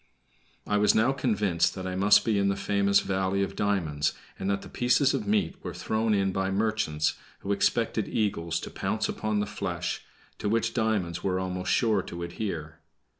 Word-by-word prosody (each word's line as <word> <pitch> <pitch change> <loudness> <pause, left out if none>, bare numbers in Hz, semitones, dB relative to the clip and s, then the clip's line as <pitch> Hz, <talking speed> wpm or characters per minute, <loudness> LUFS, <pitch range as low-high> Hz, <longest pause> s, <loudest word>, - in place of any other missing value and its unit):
I 105 - +1
was 105 - +4
now 110 +5 +4
convinced 105 -10 +1
that 95 -1 -5
I 90 0 -3
must 105 +2 +5
be 110 -3 +2
in 100 - +2
the 100 - +1
famous 100 0 +2
valley 95 0 0
of 100 0 -4
diamonds, 80 -8 0 0.3
and 95 - -2
that 100 0 -1
the - - -9
pieces 125 +3 +2
of 215 - -2
meat 210 -1 0
were 90 -2 -5
thrown 110 +4 0
in 95 -1 +1
by 95 0 -1
merchants, 100 -7 0 0.3
who 100 - -3
expected 105 +2 +1
eagles 95 -7 -1
to - - -7
pounce 110 +3 -1
upon 110 -1 -1
the - - 0
flesh, 90 -4 -3 0.4
to 105 - -1
which 115 +1 +1
diamonds 105 -7 0
were 95 -1 0
almost 90 0 -2
sure 110 -5 +3
to 85 -1 -7
adhere. 85 -4 -5
100 Hz, 185 wpm, -28 LUFS, 95-110 Hz, 0.4 s, must